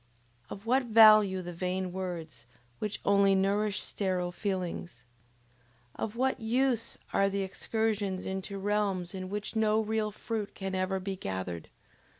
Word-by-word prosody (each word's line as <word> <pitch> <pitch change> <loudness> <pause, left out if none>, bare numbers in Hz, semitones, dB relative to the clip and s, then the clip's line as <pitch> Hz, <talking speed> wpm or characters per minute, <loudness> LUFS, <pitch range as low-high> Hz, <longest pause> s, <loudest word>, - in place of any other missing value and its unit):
Of 200 +2 -8
what 255 +3 +3
value 215 -4 +7
the 175 0 -6
vain 185 +1 -2
words, 165 -10 -6 0.3
which 210 -1 -3
only 200 -1 +5
nourish 200 +2 +1
sterile 185 -3 -1
feelings? 175 - -4 0.9
Of 220 0 -4
what 260 +2 +1
use 235 0 0 0.2
are 195 - +4
excursions 200 0 -1
into 190 +1 -4
realms 195 -3 -1
in 185 -1 -5
which 210 +3 -4
no 220 0 +3
real 220 -1 0
fruit 215 0 -4
can 195 -1 -4
ever 185 +1 0
be 190 +1 -4
gathered? 95 - -5
195 Hz, 135 wpm, -30 LUFS, 185-215 Hz, 0.9 s, value